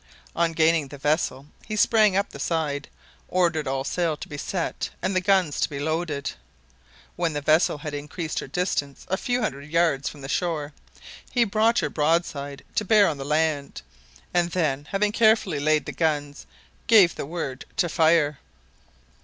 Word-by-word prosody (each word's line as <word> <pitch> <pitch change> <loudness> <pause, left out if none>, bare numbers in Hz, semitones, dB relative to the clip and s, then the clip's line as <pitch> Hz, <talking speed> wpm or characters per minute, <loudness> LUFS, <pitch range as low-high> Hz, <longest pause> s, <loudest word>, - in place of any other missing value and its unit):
On 170 0 +2
gaining 160 -2 +3
the 145 - -10
vessel, 145 -2 0 0.2
he 215 - -3
sprang 215 -2 +4
up 200 - 0
the - - -10
side, 150 -4 -1 0.4
ordered 170 -5 +1
all 135 0 -1
sail 165 +1 -1
to - - -8
be 145 - -8
set 170 +4 -3
and 190 - -2
the 185 - +2
guns 185 -5 +2
to - - +1
be 140 - -6
loaded. 155 -1 -2 0.8
When 170 -2 -1
the 145 - -1
vessel 155 +1 +3
had 145 0 -6
increased 150 +3 -4
her - - -6
distance 145 -3 -2
a 190 - +2
few 245 +2 -1
hundred 140 -7 -4
yards 160 -4 +1
from 145 - -12
the 135 - -6
shore, 155 -1 -2 0.6
he 245 - +3
brought 225 +2 +2
her 150 - -1
broadside 150 -3 -1
to - - 0
bear 210 0 +5
on 145 - -2
the - - -4
land, 150 - -1 0.5
and 175 -1 +2
then, 150 -5 -1
having 205 +1 +1
carefully 215 -8 +3
laid 155 +1 +2
the - - -4
guns, 145 -3 -2 0.4
gave 200 -7 +6
the - - -5
word 140 -6 -5
to 190 -5 +2
fire. 160 -3 +3
160 Hz, 175 wpm, -25 LUFS, 145-180 Hz, 0.8 s, gave